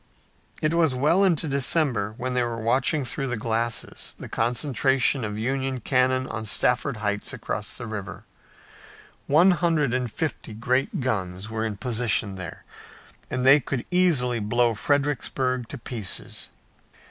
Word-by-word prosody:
It 155 +1 +2
was 165 -6 +3
well 155 +9 +3
into 170 -5 +2
December 135 -6 0
when 125 0 -3
they 125 - +2
were 120 -1 -2
watching 130 +5 +1
through 135 +2 -3
the 125 -2 -2
glasses 115 +1 -2
the - - -8
concentration 130 +2 +1
of 105 -1 -3
Union 130 +3 -1
cannon 130 +1 +2
on 110 -3 -5
Stafford 125 +4 +2
Heights 105 0 -1
across 105 +1 -4
the 120 - -6
river. 105 -4 -6 1.0
One 165 +7 +6
hundred 165 -7 +1
and 125 -2 -1
fifty 150 -7 -4
great 125 +5 0
guns 100 -4 -2
were 110 0 -2
in 105 -2 -5
position 115 -3 +1
there 90 -4 -8 0.6
and 130 0 -2
they 135 +3 +8
could 130 -1 -4
easily 145 -10 +3
blow 120 +3 +2
Fredericksburg 130 -1 0
to 140 - -7
pieces. 115 -5 -5
125 Hz, 145 wpm, -25 LUFS, 110-140 Hz, 1.0 s, they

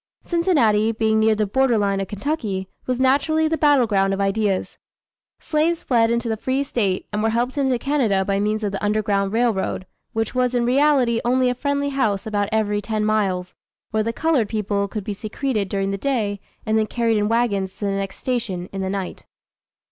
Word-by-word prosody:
Cincinnati 245 - +2
being 220 -1 +1
near 220 0 +4
the 215 0 +1
border 250 +3 +2
line 200 -1 +1
of 195 - -3
Kentucky, 205 -4 -3 0.2
was 250 -1 -1
naturally 290 +4 +3
the 320 - +1
battle 290 -4 +4
ground 195 -2 +1
of - - -7
ideas. 200 0 0 0.6
Slaves 320 +2 0
fled 230 -3 +3
into 235 0 0
the 220 - 0
free 260 +5 -1
State 200 -9 -1
and 210 - 0
were 225 - +2
helped 240 +3 -1
into 265 -3 +1
Canada 235 -8 +1
by 195 0 0
means 215 +1 0
of 205 - -1
the 195 - -5
"Underground 205 -2 +1
Railroad," 225 -5 0 0.3
which 225 -1 -1
was 250 -1 +1
in 240 -1 +2
reality 255 -3 +3
only 250 +1 +2
a - - 0
friendly 285 +2 -1
house 220 -8 0
about 205 -2 -1
every 210 -1 +1
ten 215 0 -2
miles, 195 -4 0 0.4
where 220 - +1
the 230 +2 -1
colored 270 -5 +1
people 205 -2 -1
could 210 0 -5
be 205 - -3
secreted 215 0 -2
during 195 -1 -1
the 195 - -3
day, 215 -7 -1 0.3
and 220 0 +2
then 215 - 0
carried 230 -1 +1
in 210 0 0
wagons 205 -5 0
to 205 - -5
the 200 - 0
next 195 0 -3
"station" 230 -8 -3
in 195 - -3
the 190 - -2
night. 195 -1 -5
220 Hz, 200 wpm, -22 LUFS, 200-255 Hz, 0.6 s, near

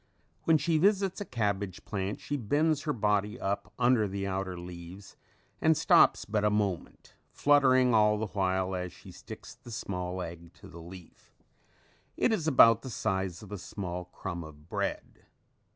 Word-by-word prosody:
When 160 -1 +5
she 155 +2 +1
visits 195 +1 +2
a - - -3
cabbage 100 - -2
plant 100 0 -3
she 145 - -4
bends 145 +5 +1
her 150 - +1
body 105 -1 0
up 100 +2 -3
under 120 -3 +3
the 100 0 -4
outer 95 -2 -3
leaves 90 +2 -10 0.5
and 160 -1 +4
stops 170 +1 +5
but 105 -1 -1
a 105 - +4
moment, 100 -4 -2 0.2
fluttering 130 -4 +4
all 105 -1 +4
the 110 - -2
while 95 -2 -1
as 90 -1 -3
she - - -14
sticks - - -10
the - - -15
small 90 -5 -4
egg 85 0 -9
to - - -14
the 85 - -11
leaf. 90 +1 -14 0.8
It 235 - +2
is 165 -7 -1
about 115 -6 +6
the 130 - -7
size 95 -5 -2
of 105 - -12
a 105 - -5
small 90 -2 -5
crumb 90 -1 -6
of 75 0 -13
bread. - - -4
105 Hz, 170 wpm, -30 LUFS, 95-130 Hz, 0.8 s, about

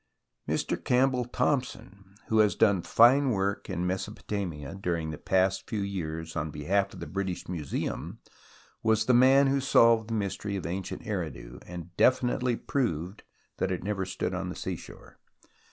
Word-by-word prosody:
Mr. - - -1
Campbell 125 0 +2
Thomson, 100 -7 -2
who 110 - +2
has 105 -1 +4
done 100 -5 +3
fine 130 +9 +5
work 100 -2 -1
in 90 -2 -2
Mesopotamia 95 -5 -4
during 85 -5 -2
the 75 - -6
past 95 0 +1
few 110 -3 -2
years 80 -5 -4
on 75 -1 -2
behalf 95 +7 0
of - - -10
the - - -5
British 95 -2 -4
Museum, 80 -6 -4 0.6
was 110 -1 +2
the 125 - +3
man 130 +3 +6
who 135 0 +2
solved 115 -4 +4
the 115 - -1
mystery 100 0 -2
of 95 - -4
ancient 90 +3 -4
Eridu, - - -5
and 90 0 -8
definitely 125 -1 +3
proved 95 - -2 0.4
that - - 0
it 90 - -3
never 100 -1 -1
stood 95 0 -3
on - - -3
the - - -6
seashore. - - -8
100 Hz, 155 wpm, -28 LUFS, 90-115 Hz, 0.6 s, man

